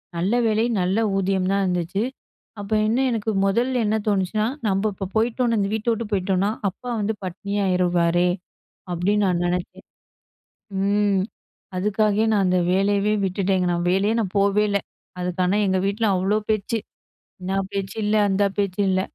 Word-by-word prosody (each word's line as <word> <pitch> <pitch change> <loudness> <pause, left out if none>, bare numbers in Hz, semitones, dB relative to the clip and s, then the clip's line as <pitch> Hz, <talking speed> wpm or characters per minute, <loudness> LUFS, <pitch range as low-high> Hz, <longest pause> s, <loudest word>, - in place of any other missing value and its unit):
நல்ல 180 +6 0
வேலை, 220 0 +2 0.2
நல்ல 185 +3 +1 0.2
ஊதியம் 190 -1 0
தான் 200 0 +2
இருந்துச்சு. 180 +1 -1 0.6
அப்ப 200 0 -8 0.2
இன்னும் 255 +5 +2
எனக்கு 225 -1 -2
மொதல 240 +6 +1
என்ன 210 +1 +1
தோணுச்சுனா, 205 +1 +1 0.2
நம்ப 195 +2 +1
இப்போ 195 0 -5
போய்ட்டோம்னா, 230 +1 +1
இந்த 200 -1 0
வீட்ட 220 +1 -3
விட்டு 230 +1 -2
போய்ட்டோம்னா, 195 0 +1 0.2
அப்பா 220 +7 -9
வந்து 210 +1 0
பட்டினியாயிருவாரே, 180 -2 +1 0.7
அப்படின்னு 200 +4 +1
நான் 175 -2 +1
நெனைச்சேன். 175 0 -3 1.0
ம். 200 -1 +2 0.5
அதுக்காகவே 210 +2 +1
நான் 205 -2 +3
அந்த 180 0 +2
வேலையவே 200 +2 +2
விட்டுட்டேங்க. 190 -1 0
நான் 175 0 -1
வேலையே 195 +4 +2
நான் 195 -4 -3
போவே 200 +1 +3
இல்ல. 200 0 +1 0.4
அதுக்கு 180 0 -3
ஆனா 185 +3 +2
எங்க 190 -1 +1
வீட்டுல 210 +3 0
அவ்ளோ 190 +3 +1
பேச்சு. 215 +2 0 0.6
என்னா 190 +1 -2 0.2
பேச்சு 195 -1 -4
இல்ல. 210 +1 +2
அந்த 195 +1 +2
பேச்சு 200 -1 0
இல்ல. 185 0 +2
195 Hz, 150 wpm, -23 LUFS, 185-210 Hz, 1.0 s, நான்